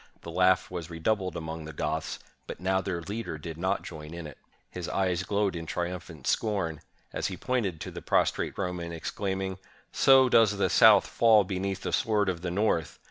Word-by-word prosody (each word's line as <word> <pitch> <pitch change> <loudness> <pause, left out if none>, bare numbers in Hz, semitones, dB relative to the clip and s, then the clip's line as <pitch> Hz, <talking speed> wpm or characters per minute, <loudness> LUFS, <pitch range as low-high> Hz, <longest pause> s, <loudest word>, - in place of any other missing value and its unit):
The 85 - -8
laugh 90 +2 +3
was 85 -2 -5
redoubled 95 +3 -1
among 80 -1 -6
the 80 - -8
Goths; 80 +1 -2 0.3
but - - -7
now 95 +1 +1
their 90 -3 -3
leader 105 -3 -5
did 80 +1 -7
not 95 +4 -1
join 80 0 -8
in 85 -1 -7
it. 75 -4 -10 0.3
His 90 -2 -5
eyes 90 -2 0
glowed 100 -1 0
in 80 -1 -6
triumphant 85 -5 -5
scorn, 95 -8 0 0.3
as - - -1
he 95 - -5
pointed 110 -10 -1
to - - -5
the - - -8
prostrate - - 0
Roman, 90 -3 -3
exclaiming, 95 +3 -3 0.3
"So 135 -1 +6
does 110 -4 +4
the 100 - +1
South - - +7
fall 110 -3 +5
beneath 95 0 -3
the - - -4
sword 105 -3 +2
of 85 -3 -3
the 90 - -3
North! 85 -5 0
90 Hz, 190 wpm, -28 LUFS, 80-100 Hz, 0.3 s, South